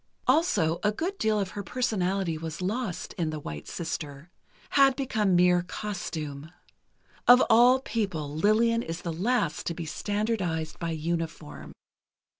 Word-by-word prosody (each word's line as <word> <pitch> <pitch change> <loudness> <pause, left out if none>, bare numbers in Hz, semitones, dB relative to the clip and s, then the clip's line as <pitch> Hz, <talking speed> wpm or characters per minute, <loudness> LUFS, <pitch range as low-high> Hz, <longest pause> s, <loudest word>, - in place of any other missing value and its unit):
Also, 215 - +2
a 210 - +2
good 345 - -3
deal 215 -1 +2
of 195 -2 -2
her 205 - -5
personality 195 -5 -1
was 160 0 -6
lost 195 +1 -3
in 165 -2 0
"The 155 -1 -4
White 75 - -7
Sister"—had 170 - -1
become 220 -9 +1
mere 180 0 +5
costume. 160 -6 -5 0.8
Of 250 +1 +8
all 245 +3 +6
people, 170 - -3
Lillian 225 +6 +3
is 165 -4 -5
the 170 - -3
last 185 -1 0
to 170 - -2
be 170 - -5
standardized 185 -2 -2
by 170 - -2
uniform. 160 - -4
180 Hz, 135 wpm, -27 LUFS, 160-220 Hz, 0.8 s, Of